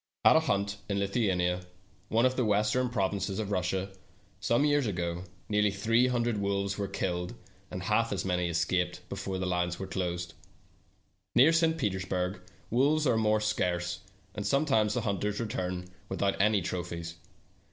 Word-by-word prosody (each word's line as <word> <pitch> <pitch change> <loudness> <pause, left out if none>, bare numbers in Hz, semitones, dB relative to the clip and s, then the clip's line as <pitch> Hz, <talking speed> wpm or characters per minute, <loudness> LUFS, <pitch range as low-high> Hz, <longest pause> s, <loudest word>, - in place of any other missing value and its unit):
At - - +8
a - - +7
hunt 100 0 0
in 100 - 0
Lithuania, 95 -3 +1 0.5
one 115 +2 +3
of 130 0 +2
the 130 - +1
western 110 +4 +2
provinces 100 -3 -1
of 105 -2 -3
Russia, 95 0 -1 0.5
some 120 +5 +2
years 145 -4 +3
ago, 85 -2 -2 0.2
nearly 105 0 +3
three 115 +5 +2
hundred 120 -3 0
wolves 100 0 0
were 100 -1 -2
killed, 90 0 -2 0.3
and 90 - -5
half 115 +4 +2
as 100 - -2
many 90 -2 0
escaped 90 +1 -1
before 95 -1 -3
the 95 - -2
lines 90 -1 0
were 95 - -4
closed. 90 -2 -3 1.0
Near 140 +7 +7
St. 165 -1 +3
Petersburg 95 - -1 0.3
wolves 145 +6 +3
are 125 - +3
more 110 -1 +3
scarce, 90 -4 -1 0.3
and 105 - -4
sometimes 110 -3 +2
the 125 - +1
hunt 100 -4 -1
ers 105 0 -1
return 90 -5 -3 0.2
without 95 0 0
any 105 -2 +3
trophies. 85 -1 -4
100 Hz, 160 wpm, -30 LUFS, 90-110 Hz, 1.0 s, At